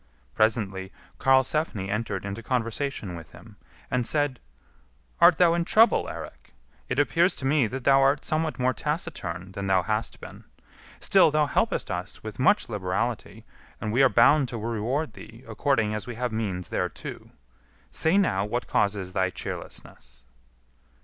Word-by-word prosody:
Presently 100 -4 0 0.3
Karlsefni 130 - +2
entered 105 -1 -3
into 100 +3 -5
conversation 115 -4 -3
with 85 -1 -11
him, - - -14 0.4
and 125 -2 0
said, 145 -4 0 0.8
"Art 170 -1 +7
thou 175 -2 +5
in 170 0 +1
trouble, 225 +6 +4
Eirik? - - -10 0.3
it - - -2
appears 175 +3 +3
to 130 - -6
me 140 -3 +3
that 130 +3 -6
thou 135 +1 +5
art 135 +2 +2
somewhat 155 0 -1
more 130 0 +1
taciturn 95 - -4
than 100 +1 -5
thou 95 -2 +3
hast 110 +3 -2
been; - - -11 0.6
still - - +5
thou 150 0 +2
helpest 140 - 0
us - - -5
with 110 +1 -8
much 205 +10 +3
liberality, 110 +2 -3 0.3
and 110 - -3
we 125 - +3
are 135 - +6
bound 130 +4 +5
to 120 - -5
reward 115 +7 -2
thee 115 +3 -13
according 115 -1 0
as 105 +3 -5
we 120 - -6
have 125 0 -2
means 100 -6 -3
thereto. - - -4 0.6
Say 160 +5 +2
now 100 - +2
what 120 +4 -3
causes 100 -3 -1
thy 95 -1 +1
cheerlessness." 60 -8 -8
120 Hz, 155 wpm, -26 LUFS, 105-145 Hz, 0.8 s, Art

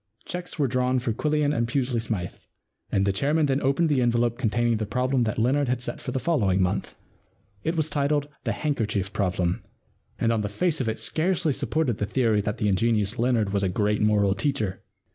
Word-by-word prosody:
* - - -35
Cheques 180 0 -6
were 145 -3 +2
drawn 125 +1 +1
for 120 -2 -1
Quillian 150 +3 +1
and 115 -2 +1
Pusely 125 -1 0
Smythe, 105 -7 -3 0.6
and 100 - +2
the 100 - +1
chairman 150 +8 +2
then 135 0 +1
opened 140 +5 +2
the 145 -4 +2
envelope 120 0 +1
containing 120 -1 +1
the 105 -1 -3
problem 125 +2 +1
that 110 - -2
Leonard 130 +5 +2
had 125 0 0
set - - -4
for 130 - -4
the 130 - -2
following 105 - +1
month. 95 +2 -1 0.7
It 160 - -1
was 155 - +2
entitled 145 -1 0
* - - -46
The - - +1
Handkerchief 110 -10 -1
Problem,' 95 +1 0 0.6
and 115 - +1
on 110 - 0
the 105 - -2
face 160 - 0
of 115 - 0
it 110 - -3
scarcely 165 -2 0
supported 135 -5 -1
the 105 - -1
theory 110 -2 +2
that 105 +1 -3
the 105 - 0
ingenious 105 +2 +1
Leonard 115 -4 +1
was 100 - +1
a 95 - +1
82 90 - -3
The 105 - +2
Win - - +3
and 105 0 +1
Lose 105 - +4
Problem - - +3
Great - - +3
Moral 100 -1 +3
Teacher. 110 -9 -1
120 Hz, 235 wpm, -25 LUFS, 105-140 Hz, 0.7 s, Lose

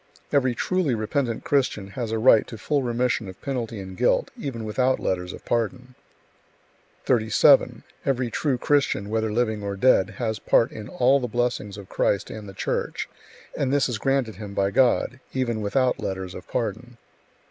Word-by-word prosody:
Every 130 -4 +3
truly 180 -3 0
repentant 115 +2 -1
Christian 125 -9 0
has 115 +1 -4
a 115 - 0
right 110 -1 +5
to 115 - -8
full 145 +6 0
remission 120 -3 0
of 95 -1 -10
penalty 120 -6 -4
and 95 -1 -8
guilt, - - +2
even 120 -5 -5
without 130 +4 +1
letters 90 -1 -2
of - - -11
pardon. 120 +2 -2 1.1
37. 110 -3 +4 0.2
Every 125 -3 0
true 140 0 0
Christian, 135 -7 +1
whether 110 -1 0
living 110 -2 0
or 100 -1 -3
dead, 100 -2 +3
has 110 -3 -2
part 115 - +3
in 105 -1 -8
all 130 +3 +3
the 125 - -2
blessings 120 -4 -2
of 100 -2 -10
Christ 100 +1 0
and 105 -2 -8
the - - -10
Church; - - -2 0.5
and 135 -2 0
this 145 -1 +3
is 120 -5 -3
granted 135 -4 0
him 105 -2 -8
by 100 0 +1
God, 125 +2 +2
even 120 -4 -1
without 125 +5 +1
letters 95 -1 -4
of - - -10
pardon. - - -3
115 Hz, 170 wpm, -24 LUFS, 105-130 Hz, 1.1 s, right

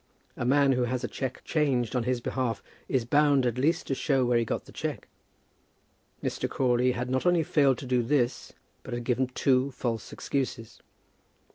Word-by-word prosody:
A - - -3
man 140 +2 +4
who 125 -1 +2
has 125 +1 -2
a - - 0
cheque 130 -2 -5
changed 130 -7 0
on 120 -2 0
his 125 0 +1
own 120 - -12
behalf 125 -5 -2 0.3
is 130 -4 +1
bound 145 0 +3
at 120 0 -1
least 155 +6 +1
to - - -1
show 135 -1 +1
where 120 -1 +3
he - - +1
got 115 - -3
the - - -14
cheque. - - -5 1.2
Mr. - - -2
Crawley 125 -1 +2
had 125 +1 -3
not 130 +6 0
only 175 -2 +4
failed 140 -4 +3
to 135 - -8
do 125 -1 +2
this, 120 0 0 0.3
but - - -6
had 120 - -4
given 125 +2 +1
two 130 +1 +2
false 115 -4 -4
excuses. 125 -5 -4
130 Hz, 190 wpm, -28 LUFS, 120-135 Hz, 1.2 s, man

